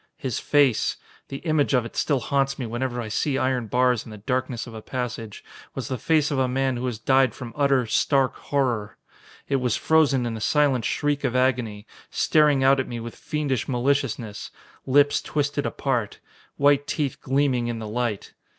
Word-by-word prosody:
His 130 -5 -3
face 140 -6 +2 0.3
the 135 +5 -8
image 155 -3 +2
of 125 -2 +1
it 115 - -9
still 140 -4 +1
haunts 135 0 0
me 130 - -4
whenever 120 +2 -3
I 115 - -4
see 135 +6 -1
iron 130 -3 0
bars 125 0 +2
in - - -12
the 105 - -9
darkness 125 +2 -2
of 120 - -10
a 110 - -8
passage 115 -4 -5 0.3
was - - -4
the 130 - -2
face 155 +3 +2
of 140 - 0
a 130 - +2
man 130 0 0
who 125 +1 -3
has 120 -3 -3
died 130 +1 +2
from 120 -2 -8
utter, 140 -3 +2
stark 135 +4 +2
horror. 125 -7 -2 0.5
It 140 - +1
was 125 -3 0
frozen 145 -6 +3
in 115 -1 -3
a 110 - -7
silent 140 -3 +2
shriek 145 -1 0
of 130 -2 -1
agony, 125 -5 0 0.2
staring 150 -3 +3
out 135 +1 +5
at 130 - -1
me 120 - -5
with 115 0 -7
fiendish 150 -5 -2
maliciousness. 125 -4 -1 0.4
Lips 145 +2 +4
twisted 145 -1 -1
apart. 125 -7 -2 0.4
White 145 0 +3
teeth 145 -3 -2
gleaming 135 -3 +1
in 120 -1 -3
the 110 -1 -6
light. 115 -2 -3
130 Hz, 185 wpm, -24 LUFS, 120-140 Hz, 0.5 s, out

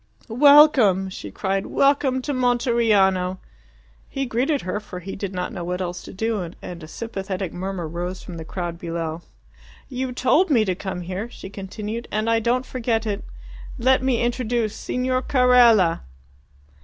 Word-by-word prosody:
"Welcome!" 250 -7 +6
she 105 - -7
cried. 195 - -2
"Welcome 275 -2 +2
to 290 - -2
Monteriano!" 230 -7 +2 0.7
He 270 0 -2
greeted 260 +4 0
her, 185 +3 -3
for 190 -4 -9
he 195 +2 -7
did 195 -1 -4
not 180 +3 -4
know 180 -4 -5
what 180 +1 -3
else 180 -1 -4
to - - -10
do, 220 +1 -2 0.2
and 175 -1 -8
a 155 - -9
sympathetic 195 -2 -5
murmur 185 -2 -4
rose 175 +3 -5
from 175 - -8
the 160 - -6
crowd 170 0 -5
below. 165 -1 -4 0.7
"You 260 -1 -3
told 280 +9 +2
me 235 -7 +4
to 185 - 0
come 185 -1 -5
here," 185 +6 -5
she 190 - -10
continued, 210 +4 -6
"and 215 +1 -1
I 230 - +3
don't 245 +3 0
forget 230 -3 -1
it. 210 -1 -3 0.5
Let 260 +1 +3
me 255 -3 +1
introduce 240 -2 -1
Signor 255 0 -1
Carella!" 245 -10 +4
215 Hz, 160 wpm, -23 LUFS, 185-250 Hz, 0.7 s, Welcome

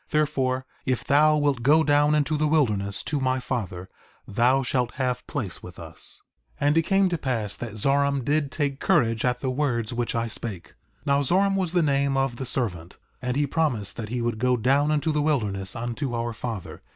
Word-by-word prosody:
Therefore, 135 -4 0 0.2
if 130 -2 -1
thou 150 +2 +4
wilt 145 -4 +1
go 150 +6 +5
down 145 0 +3
into 150 +1 +1
the 150 0 +1
wilderness 105 -10 +1
to 150 - -2
my 130 0 +1
father 95 -8 -4 0.4
thou 125 +6 +2
shalt 125 -1 -1
have 125 -2 -2
place 105 - -4
with 90 -1 -11
us. 80 -1 -4 0.4
4:35 145 - +1
And 150 +2 +3
it - - +4
came 195 +3 +2
to 175 - -1
pass 115 -8 -2
that 120 -3 -6
Zoram 140 +3 +1
did 145 0 +1
take 140 -2 -2
courage 115 -2 +2
at 125 -1 0
the 130 - -1
words 125 -4 -1
which 120 -1 -2
I 115 0 0
spake. 105 -5 -6 0.3
Now 140 -1 +3
Zoram 195 +7 +2
was 185 -3 -1
the 175 -2 +3
name 140 -2 +1
of 135 -3 0
the 130 - -4
servant; 90 -10 -2 0.2
and 125 +1 -2
he 145 - +2
promised 130 - -1
that 110 -3 -5
he 120 0 -2
would 115 -2 -2
go 125 +1 +2
down 135 +5 +2
into 155 +1 +1
the 150 -1 +1
wilderness 105 -11 -1
unto 120 +2 -3
our 115 0 -2
father. 115 -4 -6
130 Hz, 200 wpm, -25 LUFS, 115-145 Hz, 0.4 s, go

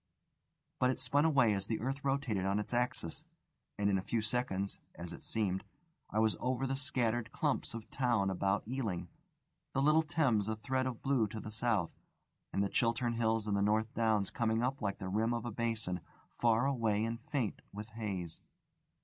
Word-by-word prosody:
But 125 - +4
it 130 - 0
spun 145 +2 +3
away 135 -9 +5
as 100 0 -2
the 110 - -1
earth 135 +4 -2
rotated 135 -8 0
on 100 +1 +1
its 105 +3 -3
axis, 120 -9 -1 0.5
and 100 - +1
in 100 -1 +3
a - - -2
few 115 +4 -1
seconds 110 -3 -1 0.2
(as 85 0 -6
it - - -9
seemed) 95 -4 0 0.5
I 105 - -3
was 110 0 +3
over 130 +1 0
the 135 0 0
scattered 120 -4 0
clumps - - 0
of 115 - -7
town 120 -7 +2
about 95 +2 0
Ealing, 115 -8 -2 0.6
the 135 - +2
little 155 +2 +6
Thames 140 -10 +2
a 110 - 0
thread 130 +3 -1
of 125 -3 -5
blue 135 -5 +3
to 110 +2 -6
the 110 - -7
south, 110 -6 +1 0.6
and 100 - +1
the - - +2
Chiltern 120 +2 +1
Hills 115 -1 +1
and 105 -2 0
the 100 - +2
North 110 +2 +2
Downs 110 -4 +2
coming 115 0 +1
up 135 +2 -1
like 100 -2 -1
the 95 - -5
rim 110 +5 +1
of 120 0 -3
a 120 - -2
basin, 110 -5 -1 0.3
far 115 +1 +3
away 115 -6 +1
and 115 +1 -3
faint 125 -4 -2
with 105 +2 -7
haze. 100 -7 -4
115 Hz, 190 wpm, -34 LUFS, 105-125 Hz, 0.6 s, little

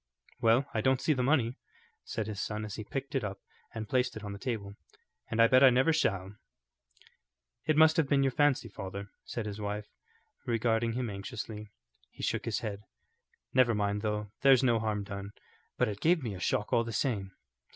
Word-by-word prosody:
"Well, 115 +4 +4
I 110 - 0
don't 130 +2 +3
see 155 - +2
the 130 - -1
money," 125 -3 +2 0.5
said 110 - -3
his 105 -1 -4
son 105 0 -3
as 105 - -7
he 110 - -5
picked 135 +5 -5
it 135 -4 0
up 100 -1 -4 0.4
and 110 -1 -4
placed 125 -2 0
it 110 - -8
on 100 -1 -5
the 100 - -8
table, 105 -6 -4 0.6
"and 110 - -2
I 115 - +8
bet 130 +2 +6
I 135 - +10
never 130 +6 +3
shall." 100 -9 0 1.3
"It 155 -1 +3
must 160 0 +6
have 160 -4 +3
been 140 -1 +4
your 135 - +2
fancy, 145 -3 +2
father," 100 -1 -7
said 115 - -4
his 105 0 -5
wife, 105 0 -4 0.5
regarding 115 -1 +1
him 120 -2 -2
anxiously. 105 +1 -6 0.4
He - - -11
shook - - -1
his - - -1
head. 100 -1 -4 0.7
"Never 125 -3 +4
mind, 100 0 0
though; 105 -1 -2
there's 135 -2 +6
no 120 -3 +3
harm 105 -2 -1
done, 100 0 -7 0.4
but - - +2
it 105 -1 -5
gave 165 -2 +3
me 115 -4 -3
a 95 - -7
shock 105 +5 -1
all 115 -1 +4
the 115 - -5
same." 100 -4 -1
110 Hz, 200 wpm, -31 LUFS, 105-130 Hz, 1.3 s, I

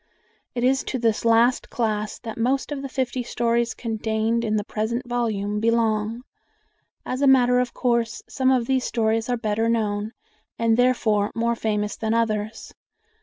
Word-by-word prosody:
It 240 - -1
is 265 +1 +3
to 260 - -2
this 230 -3 0
last 230 +2 +3
class 215 -2 -2
that 225 -2 -7
most 265 +5 0
of 285 -2 -3
the 275 - -5
fifty 255 -1 -2
stories 235 0 0
contained 225 0 -1
in 215 -2 0
the 210 - 0
present 230 +4 -3
volume 210 -4 -1
belong. 225 0 +1 0.8
As 255 +2 -3
a 280 - +4
matter 250 -2 +5
of 250 -1 -2
course, 235 -3 0
some 260 -1 +1
of 255 -3 +2
these 260 0 +1
stories 225 0 0
are 245 - +1
better 225 0 0
known, 215 -1 -1 0.4
and 230 -1 +2
therefore 225 -4 +2
more 235 0 +1
famous, 210 -2 -1
than 220 0 -1
others. 220 -1 -2
230 Hz, 165 wpm, -23 LUFS, 220-245 Hz, 0.8 s, matter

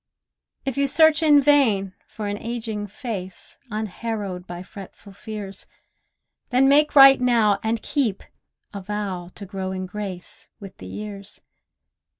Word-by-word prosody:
If 270 0 -3
you 280 - +2
search 315 +2 +5
in 300 -2 +6
vain 225 -10 +3
for 215 - -7
an 205 0 -3
ageing 225 -3 -4
face 205 -5 -7
Unharrowed 210 -3 -4
by 175 0 -7
fretful 200 +1 -12
fears, 200 -1 -7 0.8
Then 260 +2 +4
make 295 +2 +4
right 270 -2 +9
now 225 -5 +3
(and 220 0 -2
keep) 250 -10 -1 0.5
a 200 - -6
vow 190 -3 -4
To 205 - -8
grow 190 -1 -5
in 185 0 -4
grace 185 -2 -6
with 195 -2 -11
the - - -9
years. 205 -1 -7
210 Hz, 140 wpm, -23 LUFS, 195-250 Hz, 0.8 s, right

